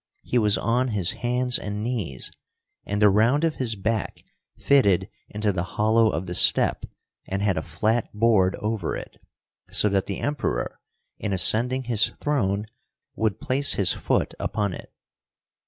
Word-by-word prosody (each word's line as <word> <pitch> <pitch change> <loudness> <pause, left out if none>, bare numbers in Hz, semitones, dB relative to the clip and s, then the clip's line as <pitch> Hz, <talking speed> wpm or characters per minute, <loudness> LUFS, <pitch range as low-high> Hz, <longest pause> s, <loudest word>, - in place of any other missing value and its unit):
He 125 - +1
was 105 -2 +2
on 120 +3 +1
his 100 -7 +1
hands 125 0 0
and 105 +1 -5
knees, 105 - -3 0.6
and 100 0 -2
the 105 -1 +5
round 115 +9 +3
of 165 -2 0
his 120 -4 -1
back 110 +1 -3 0.3
fitted 100 -9 +3 0.2
into 105 0 -1
the 90 - -1 0.2
hollow 110 +1 +4
of 90 -2 -3
the 90 - -5
step, - - +3 0.4
and 95 +1 -2
had 100 -3 +2
a 80 - -1
flat 105 +9 -1
board 105 -4 +2
over 105 -5 -3
it, - - -9 0.5
so 105 - +3
that 95 -1 0
the 100 - -4
Emperor, 145 0 -2 0.4
in 100 - -2
ascending 120 +8 +2
his 115 -3 +1
throne, 105 -9 0 0.5
would 110 -3 -1
place 140 +2 +1
his 95 -3 +3
foot - - -1
upon 100 -3 -2
it. - - -10
105 Hz, 155 wpm, -24 LUFS, 100-120 Hz, 0.6 s, the